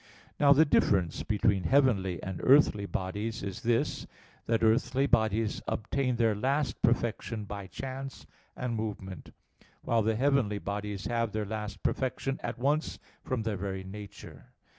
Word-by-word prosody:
Now, 140 -1 +6
the 150 +3 +7
difference 95 - +2
between 100 -3 +1
heavenly 105 -11 +2
and 95 -2 -4
earthly 130 -7 +5
bodies 105 +5 -3
is 100 -2 -5
this, 115 -1 0 0.4
that 115 0 +1
earthly 125 +4 +3
bodies 110 -3 +1
obtain 125 +3 -1
their 115 -2 +3
last 135 +7 -1
perfection 115 -2 0
by 100 -1 -6
chance 135 +7 -7 0.3
and 125 -2 -2
movement: 100 -5 -5 0.5
while 115 -1 +2
the 110 +1 +1
heavenly 130 -4 +2
bodies 100 0 -4
have 115 -2 -1
their 110 -1 -1
last 105 0 -5
perfection 135 +1 -1
at - - -4
once 145 +5 0 0.3
from 130 -4 -2
their 110 -2 -2
very 95 0 -4
nature. 100 +1 -10
110 Hz, 140 wpm, -30 LUFS, 100-130 Hz, 0.5 s, the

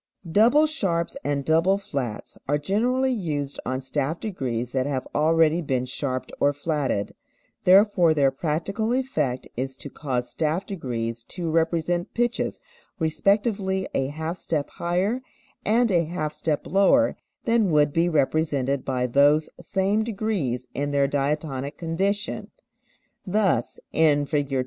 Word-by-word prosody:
Double 240 - +5
sharps 190 - 0
and 140 -1 -1
double 165 +5 +3
flats 140 - -5
are 145 +2 +2
generally 245 - +1
used 150 - -2
on 130 +1 -1
staff 145 +4 -2
degrees 125 - -3
that 130 0 0
have 135 -3 -2
already 160 +2 +3
been 130 -5 -1
sharped 130 0 -3
or 145 - +4
flatted, 145 -8 -2 0.5
therefore 185 -2 +6
their 140 -3 +3
practical 175 - -1
effect 195 - -1
is 130 +1 -4
to 145 - -8
cause 125 -5 -2
staff 160 +4 -1
degrees 115 - -4
to 170 +5 -4
represent 165 +1 0
pitches 240 0 0 0.4
respectively 190 +3 +1
a 135 - 0
half 160 +4 -4
step 150 -6 -2
higher 185 +8 -1 0.4
and 230 +1 +3
a 170 -2 +3
half 155 -2 -3
step 155 -2 -2
lower 200 - +4 0.3
than 230 -4 +3
would 150 -2 +3
be 170 +1 +2
represented 140 -3 +1
by 130 -2 -1
those 145 +5 +3
same 200 +2 0
degrees 195 - -2
in 145 +1 -2
their 140 -1 +2
diatonic 140 0 -2
condition. 195 +6 -2 0.7
Thus 190 - 0
in 150 -2 +3
Fig. 145 -1 -1
160 Hz, 135 wpm, -25 LUFS, 140-195 Hz, 0.7 s, therefore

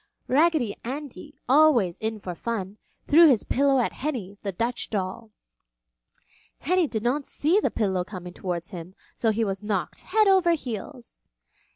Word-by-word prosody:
Raggedy 290 -5 +2
Andy, 285 +2 -7
always 255 - +4
in 220 0 -3
for 185 -3 -6
fun, 205 0 -4 0.3
threw 330 +3 +7
his 255 -8 +3
pillow 275 +1 +2
at 245 - 0
Henny, 245 -9 -4
the 200 - -3
Dutch 230 +6 -3
doll. 205 +2 -4 1.3
Henny 360 +2 +1
did 220 -5 -4
not 270 +4 0
see 330 +8 +2
the - - +1
pillow 190 -5 0
coming 180 -2 -9
towards 175 -1 -4
him 180 0 -9 0.2
so 225 - +1
he 220 +1 +1
was 195 -1 -3
knocked 210 -3 -3
head 430 +3 +2
over 375 -3 +4
heels. 250 -3 -7
235 Hz, 155 wpm, -25 LUFS, 195-295 Hz, 1.3 s, threw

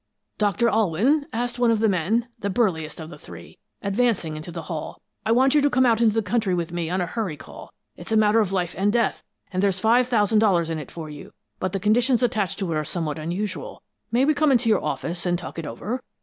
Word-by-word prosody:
"'Doctor 210 +2 +2
Alwyn?' 225 - +2
asked 240 +1 -3
one 240 -1 +4
of 225 -2 +2
the 220 - +3
men, 205 +6 +1
the 200 - -2
burliest 180 -9 0
of 160 +1 -8
the - - -11
three, - - -12 0.2
advancing 200 -6 0
into 155 +3 -7
the 165 -1 -6
hall. 155 -1 -6 0.3
'I 225 - +4
want 260 +3 +4
you 300 - +5
to 290 - +3
come 260 -1 +3
out 230 -2 +3
into 220 -2 +4
the 225 - +1
country 210 -4 0
with 170 -1 -3
me 170 -2 -3
on 185 +1 0
a - - 0
hurry 185 -4 -3
call. - - -12 0.2
It's - - -9
a 220 - +4
matter 215 +1 +4
of 205 -4 +1
life 180 -3 -1
and 200 +2 +1
death, 235 0 +1 0.3
and 185 - 0
there's 195 -2 +2
five 235 +4 +4
thousand 220 -3 +3
dollars 175 -6 +2
in 160 - -2
it 145 - -8
for 165 -2 -7
you, 150 -1 -10 0.3
but 185 - -1
the 195 - -2
conditions 235 +5 +2
attached 215 -7 0
to 185 -5 -2
it - - 0
are 155 - 0
somewhat 155 -1 -3
unusual. 195 - -4 0.3
May 245 +3 +3
we 310 - +4
come 300 0 +3
into 245 -2 +3
your 215 - +3
office, 170 +1 -3
and 175 0 +1
talk 170 -1 -7
it 160 - -5
over?' 215 - -4
205 Hz, 245 wpm, -24 LUFS, 175-235 Hz, 0.3 s, you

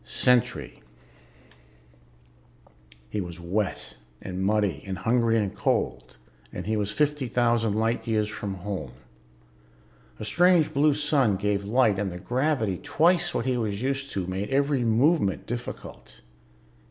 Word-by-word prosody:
Sentry 125 -2 +1 2.3
He 105 - -1
was 85 -1 -7
wet 90 +3 -3 0.2
and 95 0 -5
muddy 100 -6 +1
and 95 -1 -3
hungry 115 +2 +2
and 105 -3 -1
cold, 65 0 -1 0.3
and 90 - -6
he 110 +2 0
was 105 -2 -1
fifty 145 +3 0
thousand 115 -2 +1
light 115 +2 0
years 110 -2 +1
from 105 -2 -5
home. 90 -8 -5 1.3
A 110 - -5
strange 175 - +3
blue 145 +1 +3
sun 145 -8 +2
gave 100 +1 -1
light 110 -2 +2
and 100 -2 -2
the 90 - -6
gravity, 120 - -1
twice 175 +2 +2
what 115 - -1
he 130 -1 +1
was 110 -1 -2
used 135 0 -2
to, 95 -2 -2
made 95 +3 -3
every 140 -1 +1
movement 115 - +2
difficult. 120 +1 -8
110 Hz, 135 wpm, -26 LUFS, 100-135 Hz, 2.3 s, strange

